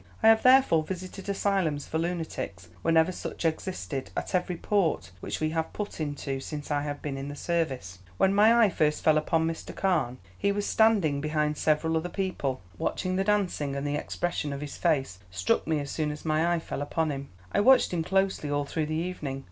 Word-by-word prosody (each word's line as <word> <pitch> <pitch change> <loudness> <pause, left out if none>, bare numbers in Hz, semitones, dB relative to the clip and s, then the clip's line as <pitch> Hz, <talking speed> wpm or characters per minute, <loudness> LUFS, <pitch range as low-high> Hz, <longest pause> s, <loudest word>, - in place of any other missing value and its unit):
I 220 - +8
have 225 0 +6
therefore 255 -11 +6
visited 185 +4 -6
asylums 195 -7 0
for 160 - -1
lunatics 160 - -4
whenever 165 +1 +3
such 175 - -5
existed, 160 -4 -2
at - - -3
every 180 -1 0
port 195 -3 0
which - - -4
we 155 0 0
have 160 0 -2
put 205 -5 -5
into 145 -2 -3
since 145 +2 -6
I 145 0 +1
have 145 0 -5
been 135 -2 -3
in 135 - -5
the 145 - -6
service. 135 - -2 0.2
"When 190 - +3
my 225 +3 +6
eye 210 - +5
first 150 -2 +1
fell 155 - +5
upon 160 +1 +1
Mr. 165 0 -4
Carne 135 -10 +1 0.2
he 200 - +1
was 205 0 -1
standing 200 -11 +3
behind 150 0 0
several 155 +2 +1
other 170 +2 -2
people, 175 -10 -2 0.2
watching 185 0 -1
the 190 - +1
dancing, 190 -9 0
and 140 +1 -3
the 145 - -1
expression 150 0 -2
of 140 0 -5
his 150 -1 -6
face 135 - 0
struck 90 +8 0
me 160 -2 +1
as 140 -1 -5
soon 155 -2 -1
as 150 +2 -7
my 160 +2 +2
eye 175 - +2
fell 160 - -5
upon 155 +2 0
him. 140 0 -5 0.2
I - - +1
watched 250 -1 +5
him 165 -2 0
closely 190 -4 0
all 145 0 0
through 155 +2 -2
the 155 - -2
evening. 155 -5 -3
160 Hz, 205 wpm, -28 LUFS, 145-185 Hz, 0.2 s, I